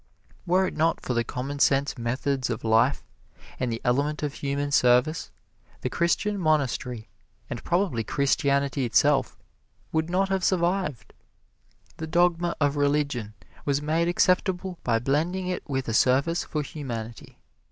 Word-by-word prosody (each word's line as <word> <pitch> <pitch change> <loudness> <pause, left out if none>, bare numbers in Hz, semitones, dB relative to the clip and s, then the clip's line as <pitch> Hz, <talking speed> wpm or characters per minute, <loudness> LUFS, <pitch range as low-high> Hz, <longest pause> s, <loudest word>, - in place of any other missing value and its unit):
Were 185 +2 +3
it - - -4
not 160 +1 +1
for 125 - -3
the 120 0 +1
commonsense 140 +2 0
methods 130 +2 -1
of 115 0 -3
life, 115 +5 +3 0.6
and 125 -2 -1
the 115 - -3
element 145 +5 0
of 145 -1 -2
human 145 0 -2
service, 125 +4 +3 0.5
the 125 - -3
Christian 195 +6 0
monastery 130 -8 0 0.4
and 120 - -5
probably 175 - 0
Christianity 140 +1 +1
itself 130 +3 +2 0.5
would 160 +1 0
not 190 +2 +1
have 190 -1 0
survived. 175 - 0 0.8
The 160 - -5
dogma 175 +1 +2
of 145 -1 +1
religion 140 -7 0 0.3
was 140 -1 +1
made 160 +3 +1
acceptable 180 0 +1
by 115 -2 +2
blending 160 +10 0
it 180 0 -2
with 135 -2 -2
a 115 - -1
service 135 +9 +2
for 150 -1 -2
humanity. 120 -6 -7
145 Hz, 140 wpm, -26 LUFS, 125-170 Hz, 0.8 s, Were